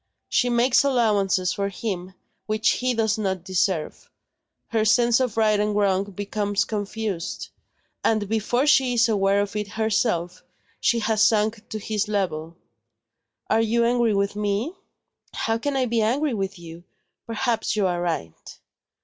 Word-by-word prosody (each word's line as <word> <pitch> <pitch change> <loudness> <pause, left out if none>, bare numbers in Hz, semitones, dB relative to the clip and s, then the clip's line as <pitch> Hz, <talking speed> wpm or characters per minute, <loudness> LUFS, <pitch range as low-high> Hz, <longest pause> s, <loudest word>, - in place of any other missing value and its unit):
She 245 - +2
makes 240 +2 +3
allowances 205 -8 +2
for 200 0 -2
him, 185 -2 -5 0.3
which 215 +1 +1
he 250 0 0
does 220 -1 +1
not 190 -4 -2
deserve; 185 -3 -1 0.6
her 225 -2 +1
sense 235 +2 +4
of 250 -4 -1
right 215 -2 +3
and 210 0 0
wrong 200 -1 +2
becomes 205 +1 -2
confused; 205 -3 -4 0.5
and 215 -2 +1
before 225 +5 0
she 265 -4 +4
is 235 0 +4
aware 200 -2 +2
of 205 0 -4
it 210 -1 -2
herself, 215 -5 0 0.4
she 235 - +2
has 220 -1 0
sunk 215 0 +2
to 220 - -4
his 215 0 -2
level. 170 -5 -2 0.9
Are 225 - +3
you 230 +1 +2
angry 235 -2 +2
with 200 +1 0
me?" 210 - -1 0.6
"How 225 0 -1
can 285 +3 -2
I 260 - +2
be 235 -1 0
angry 265 +6 +1
with 195 -2 -3
you? 170 0 -11 0.4
Perhaps 230 0 -1
you 210 -2 +1
are 175 -1 0
right." 160 - -5
215 Hz, 150 wpm, -24 LUFS, 195-230 Hz, 0.9 s, sense